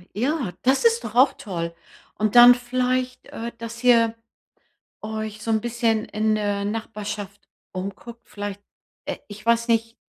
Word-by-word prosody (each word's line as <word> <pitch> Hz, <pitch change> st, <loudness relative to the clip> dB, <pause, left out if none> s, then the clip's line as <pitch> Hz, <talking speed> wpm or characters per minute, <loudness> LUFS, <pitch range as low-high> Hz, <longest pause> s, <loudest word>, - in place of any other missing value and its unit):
Ja, 255 Hz, -, -1 dB
das 265 Hz, -, +2 dB
ist 465 Hz, +1 st, +3 dB
doch -, -, -6 dB
auch 260 Hz, +3 st, +5 dB
toll. 170 Hz, -4 st, -5 dB, 0.4 s
Und 215 Hz, +1 st, 0 dB
dann 245 Hz, +1 st, +10 dB
vielleicht, 255 Hz, +1 st, -1 dB
äh, 235 Hz, +1 st, -6 dB
dass 230 Hz, +1 st, -7 dB
ihr 230 Hz, -2 st, +5 dB, 0.9 s
euch 215 Hz, 0 st, -5 dB
so 225 Hz, -, -2 dB
'n 220 Hz, -1 st, +2 dB
bisschen 230 Hz, -2 st, 0 dB
in 215 Hz, 0 st, 0 dB
der 205 Hz, -1 st, -1 dB
Nachbarschaft 210 Hz, -2 st, -5 dB, 0.3 s
umguckt. 200 Hz, +5 st, -7 dB
Vielleicht, 205 Hz, -1 st, -6 dB, 0.4 s
äh -, -, -3 dB
ich 210 Hz, +1 st, -11 dB
weiß 235 Hz, 0 st, +3 dB
nicht, 230 Hz, 0 st, +1 dB
225 Hz, 150 wpm, -23 LUFS, 210-240 Hz, 0.9 s, dann